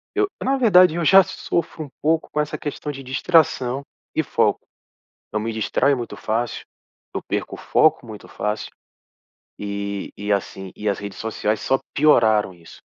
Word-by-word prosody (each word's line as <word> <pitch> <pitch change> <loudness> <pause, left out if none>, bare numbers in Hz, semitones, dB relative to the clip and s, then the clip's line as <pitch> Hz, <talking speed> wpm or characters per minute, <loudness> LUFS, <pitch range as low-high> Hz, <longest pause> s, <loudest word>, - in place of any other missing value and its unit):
eu, 410 0 +2 0.2
na 270 +1 +1
verdade, 185 -9 +6
eu 170 -1 -1
já 195 +4 +8
sofro 170 -4 -3
um - - -13
pouco 160 +1 +1
com 150 - -2
essa 150 - -3
questão 150 0 -5
de 135 -1 -8
distração 135 -2 +2 0.3
e - - +3
foco. - - +1 0.7
Eu 105 - 0
me 115 +1 -3
distraio 110 +5 +1
muito 120 -2 -6
fácil. 115 +2 -2 0.5
Eu - - -2
perco - - -2
o - - -17
foco 155 -5 +3
muito 110 -2 -10
fácil. 105 +1 -3 0.9
E 100 -1 -4
e 105 +1 -3
assim, 95 -1 -2
e 105 - -2
as 100 - 0
redes 100 -1 -7
sociais 110 -1 -2
só 135 - +1
pioraram 110 -9 +4
isso, 85 -2 -15
125 Hz, 165 wpm, -22 LUFS, 105-155 Hz, 0.9 s, já